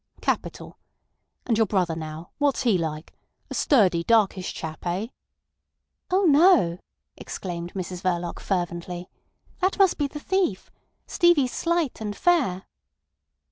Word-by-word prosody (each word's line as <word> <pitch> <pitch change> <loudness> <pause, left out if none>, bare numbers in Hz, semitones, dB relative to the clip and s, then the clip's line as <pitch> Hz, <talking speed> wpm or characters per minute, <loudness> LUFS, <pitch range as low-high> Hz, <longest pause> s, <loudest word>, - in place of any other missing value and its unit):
Capital. - - -3 0.7
And 230 -3 +1
your 220 - +3
brother 180 -5 0
now, 160 +1 -7
what's 285 -2 +1
he 230 -6 +3
like—a 160 -2 -6
sturdy, 190 - +3
darkish 200 -3 +2
chap—eh?" 175 +6 -4 1.0
"Oh 375 +2 +2
no," 305 - +5 0.4
exclaimed 175 -1 -6
Mrs 180 -1 -5
Verloc 175 -2 -2
fervently. 175 -1 -3 0.5
"That 375 0 +1
must 390 -5 +3
be 290 - +1
the 295 +2 -8
thief. 365 - -1 0.3
Stevie's 340 -8 +3
slight 335 -8 -1
and 210 -1 -4
fair." 260 - +2
195 Hz, 115 wpm, -25 LUFS, 175-290 Hz, 1.0 s, no